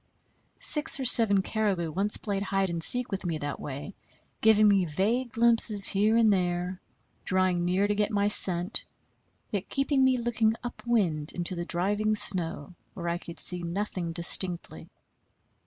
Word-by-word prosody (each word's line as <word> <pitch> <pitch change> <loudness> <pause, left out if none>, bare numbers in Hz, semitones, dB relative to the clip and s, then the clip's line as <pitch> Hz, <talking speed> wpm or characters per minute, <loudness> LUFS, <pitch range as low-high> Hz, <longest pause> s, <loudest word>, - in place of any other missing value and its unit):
Six 300 -2 +4
or 265 - -4
seven 205 -5 +4
caribou 195 -7 -3
once 195 +6 -1
played 200 -2 -5
hide 195 -2 -2
and 165 -1 -1
seek 250 +5 +7
with 195 - -5
me 170 -3 -4
that 145 -1 -7
way, 145 +8 -9 0.5
giving 215 -1 +3
me 200 -2 +2
vague 215 +10 -3
glimpses 230 -3 +4
here 210 +3 0
and 220 -3 +3
there, 180 0 -4 0.4
drawing 185 -2 -1
near 185 +3 -1
to 205 - -1
get 210 0 -2
my 205 -2 -1
scent, 185 -1 +1 0.7
yet 200 -2 -5
keeping 275 0 -1
me 260 -1 +1
looking 230 -2 -1
up 240 - -8
wind 170 -10 -1
into 175 +1 -3
the 170 -1 -6
driving 205 +5 -2
snow 170 -6 0 0.2
where 170 -2 -6
I 170 +1 -4
could 170 -1 -12
see 180 -1 -2
nothing 175 0 -5
distinctly. 170 - +1
195 Hz, 160 wpm, -26 LUFS, 175-215 Hz, 0.7 s, seek